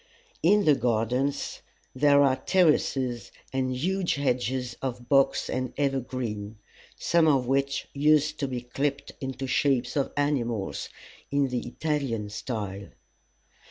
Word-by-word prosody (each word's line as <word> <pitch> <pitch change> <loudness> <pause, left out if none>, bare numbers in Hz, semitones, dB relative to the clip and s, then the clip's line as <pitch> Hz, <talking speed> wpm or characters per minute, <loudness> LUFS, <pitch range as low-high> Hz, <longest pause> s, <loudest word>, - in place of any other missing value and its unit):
In 200 +5 +4
the 150 - +6
gardens 125 +3 0 0.3
there 140 +1 +5
are 130 -1 +3
terraces 135 -9 +1 0.2
and 130 -1 0
huge 185 +5 0
hedges 125 -2 -1
of 120 -2 -4
box 135 0 +3
and 130 -1 -3
evergreen, 125 -6 -2 0.4
some 170 -2 +3
of 135 -4 +3
which 135 +2 0
used 150 +1 +3
to 140 - 0
be 125 -2 -4
clipped 140 +3 -2
into 135 0 -4
shapes 130 -1 +1
of 140 -2 0
animals, 120 -8 -1 0.4
in 140 -1 +1
the 125 -1 -3
Italian 135 -9 -2
style. 105 -3 -5
135 Hz, 125 wpm, -27 LUFS, 120-145 Hz, 0.4 s, the